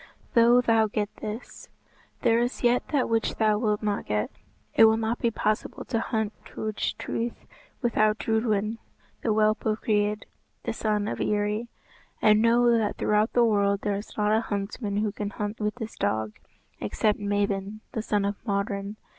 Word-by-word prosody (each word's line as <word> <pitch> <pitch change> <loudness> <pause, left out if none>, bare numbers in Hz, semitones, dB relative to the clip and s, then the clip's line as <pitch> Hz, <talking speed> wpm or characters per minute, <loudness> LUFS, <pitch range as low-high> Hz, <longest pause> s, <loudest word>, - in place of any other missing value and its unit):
"Though 240 +1 +6
thou 225 -2 +3
get 210 0 -3
this, 215 +3 -7 0.5
there 230 -2 +4
is 245 +2 -2
yet 245 +1 +3
that 285 -4 +1
which 225 -1 0
thou 215 -1 +2
wilt 215 -2 0
not 205 -1 -1
get. 105 0 -1 0.4
It 225 - +7
will 220 0 +5
not 225 +1 -1
be 235 - +2
possible 215 -1 -2
to 230 -3 -1
hunt 220 -2 -1
Turch 215 -1 -3
Truith 235 +1 -4 0.4
without 215 -2 +3
Drudwyn 220 -1 0 0.4
the - - -1
whelp 215 0 +2
of 215 0 0
Greid, 210 -1 +1 0.4
the - - -2
son 210 -1 0
of - - -3
Eri, 210 +2 0 0.5
and 215 0 +5
know 235 +1 +4
that 220 -3 0
throughout 210 +2 +2
the 240 -1 +5
world 200 -2 +2
there 205 - 0
is 205 - -9
not 210 0 +3
a 220 - +2
huntsman 200 0 -3
who 210 0 +1
can 205 0 -4
hunt 205 +1 -4
with 210 0 -1
this 225 -2 -6
dog, 110 +1 -1 0.5
except 210 - 0
Mabon 205 0 -1
the 220 - -2
son 205 -2 0
of 200 0 -1
Modron. 200 -1 -2
215 Hz, 170 wpm, -26 LUFS, 205-225 Hz, 0.5 s, It